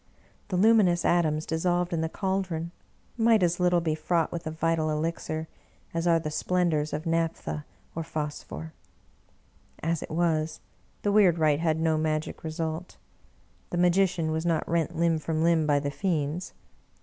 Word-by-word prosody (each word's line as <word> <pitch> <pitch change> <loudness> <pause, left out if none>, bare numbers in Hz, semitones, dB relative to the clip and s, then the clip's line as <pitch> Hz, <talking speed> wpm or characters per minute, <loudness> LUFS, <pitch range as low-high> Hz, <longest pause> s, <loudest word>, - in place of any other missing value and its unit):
The 185 - -1
luminous 195 -4 +4
atoms 155 -3 +2
dissolved 175 +2 0
in 165 - 0
the 160 - -1
caldron 185 -3 -2 0.5
might 225 -3 +4
as 175 0 +1
little 180 -1 +3
be 160 -2 0
fraught 160 +1 0
with 170 -1 -5
a - - 0
vital 160 0 0
elixir 155 0 -2 0.5
as 165 +1 -1
are 170 -1 +5
the 155 -2 -3
splendors 160 -2 0
of 155 +3 -4
naphtha 165 -2 -1 0.3
or 165 - -3
phos 150 -2 -4
phor. 80 +3 -8 1.1
As 165 -1 0
it - - -7
was, 160 -1 0 0.4
the 205 - +2
weird 195 -5 +5
rite 155 -2 +3
had 160 -1 +1
no 160 -1 +2
magic 155 0 -2
result. 160 +1 -4 0.7
The 175 - -3
magician 175 -2 +2
was 160 0 -1
not 165 -2 0
rent 170 0 0
limb 165 -1 +2
from 160 0 -1
limb 165 -2 +3
by 145 -1 +4
the 145 0 -3
fiends. 165 0 -2
165 Hz, 160 wpm, -27 LUFS, 155-175 Hz, 1.1 s, are